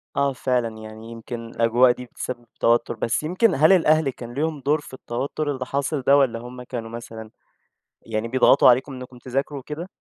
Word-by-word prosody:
آه 140 -1 +1
فعلًا، 125 -3 -1
يعني 110 +1 -10
يمكن 115 0 -7
الأجواء 120 +2 +4
دي 125 0 -6
بتسبِّب 120 0 -7
توتُّر، 120 0 +2
بس 115 +6 -1
يمكن 185 +5 +2
هل 155 +6 +5
الأهل 155 -4 +4
كان 120 -1 -8
ليهم 155 +2 -2
دور 145 +3 +1
في - - -14
التوتُّر 140 +4 -3
اللي 130 -2 -4
حاصل 140 +2 -2
ده؟ 140 +2 +5
والّا 125 -5 +2
هُم 125 +1 -9
كانوا 120 -2 -6
مثلًا 115 -1 -8 0.7
يعني 110 0 -3
بيضغَطوا 130 +1 +5
عليكم 130 +3 +2
إنكم 125 -1 -9
تذاكروا 135 +3 -3
وكده؟ 150 +7 -7
125 Hz, 180 wpm, -23 LUFS, 115-140 Hz, 0.7 s, هل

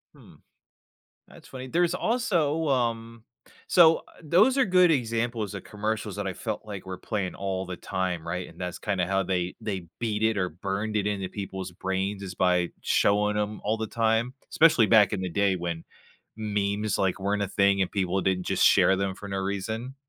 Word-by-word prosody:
Hmm. - - -17 0.9
That's - - -16
funny. 130 0 -8
There's 175 +3 +1
also, 170 - 0
um 115 -3 -1 0.4
So 165 -2 +6 0.2
those 190 - +4
are 270 - +5
good 180 -3 +5
examples 115 -5 -1
of 100 - -7
commercials 105 -1 -3
that 100 -1 -3
I 95 - -2
felt - - -4
like 100 -3 -8
were 95 -1 -5
playing 100 -5 -3
all 95 -1 -3
the 90 0 -5
time, 90 -4 -3
right? 90 +2 -3
And 85 - -16
that's 90 -1 -4
kinda 95 -4 -1
how 95 +1 +1
they 90 -1 -2
they 95 -5 -4
beat 110 -2 -1
it 110 -1 +2
or 90 -2 0
burned 100 +5 -3
it 105 -1 0
into 100 -3 -2
people's 95 -2 -6
brains 95 +2 -3
is 95 -2 -6
by 90 -1 +2
showing 105 +1 +2
'em 105 0 -2
all 110 +2 +1
the 110 0 -3
time, 115 +2 +1 0.2
especially 150 -9 +5
back 110 -2 +5
in 100 - -1
the 95 - -2
day 100 0 +2
when 85 -2 -4 0.5
memes, 105 -1 -1
like, 95 0 +1
weren't 100 +1 -1
a - - -2
thing 100 0 +2
and 95 - +1
people 95 -1 0
didn't 90 -1 0
just - - +2
share 95 - +5
them 95 -1 -2
for 100 - -9
no 95 - -2
reason. 110 +7 -3
100 Hz, 190 wpm, -27 LUFS, 95-115 Hz, 0.9 s, So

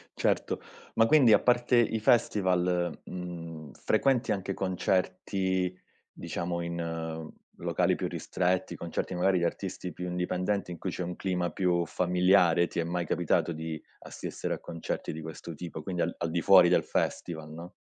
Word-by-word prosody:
Certo. - - 0 0.3
Ma 115 - +5
quindi 125 -3 +6
a - - +7
parte 120 0 +3
i 115 -1 +3
festival, 90 -6 +2
mhmm, 85 -4 -7
frequenti 130 -4 +1
anche 95 -1 -1
concerti, 95 0 0 0.4
diciamo, 85 0 -4
in 80 -2 -4 0.3
locali - - +1
più - - -2
ristretti, 90 0 -1
concerti 85 +2 -4
magari 90 +1 +3
di 85 - +1
artisti 90 -1 -4
più 90 +2 -5
indipendenti 90 +2 -1
in 85 - -6
cui 95 +3 -4
c'è 90 - -3
un 90 0 -4
clima 90 -3 -1
più 90 -1 +1
familiare? 90 0 +3
Ti - - -4
è - - +2
mai 85 +1 -2
capitato 85 - +1
di 80 0 -5 0.2
assistere - - -5
a - - -11
concerti 85 -1 -4
di 80 - -6
questo 80 +1 -7
tipo, 80 -1 -7
quindi 90 +1 -3
al 85 - 0
al 85 -1 -2
di 85 - 0
fuori 95 -2 +7
del 90 - +4
festival, 80 -2 -2
no? 85 +3 -9
90 Hz, 160 wpm, -29 LUFS, 85-95 Hz, 0.4 s, a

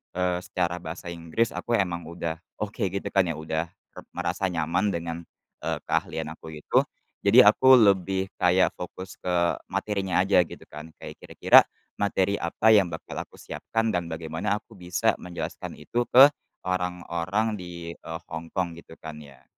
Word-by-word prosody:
eee, 90 -1 0
secara 90 -2 -2
bahasa 85 +1 -7
Inggris, 85 +7 -1
aku 120 - -1
emang 85 -5 -1
udah 85 -1 -4 0.2
oke, 105 0 -6
gitu 95 +2 -4
kan, 95 -2 +3
ya, 80 - -2
udah 80 +2 -3 0.2
re - - -10
merasa 95 - -1
nyaman 90 +3 0
dengan, 85 0 -4 0.4
eee, - - -2
keahlian 80 -1 -2
aku 80 - -12
itu. 75 - +2 0.4
Jadi 115 +6 +7
aku 130 +6 +7
lebih 95 -4 +3
kayak 90 +1 +4
fokus 90 0 -8
ke 85 -1 0
materinya 95 -3 0
aja, 100 0 +4
gitu - - -11
kan. 75 +2 -8
Kayak - - -9
kira-kira, - - +6 0.4
materi 100 0 +1
apa 85 +6 +2
yang 100 -4 +6
bakal 80 -2 -7
aku - - -19
siapkan 115 0 -2
dan 90 -3 -1
bagaimana 80 +5 -2
aku 105 - -10
bisa 90 +5 0
menjelaskan 90 -1 -6
itu, 120 0 -2
ke 135 +3 +8 0.3
orang-orang 90 +3 -1
di, 85 -1 -7
eee, 80 -1 -8
Hong 80 0 -5
Kong, 90 -3 0
gitu 80 - -14
kan, 80 -1 -7
ya. 70 -3 -15
90 Hz, 160 wpm, -26 LUFS, 85-100 Hz, 0.4 s, ke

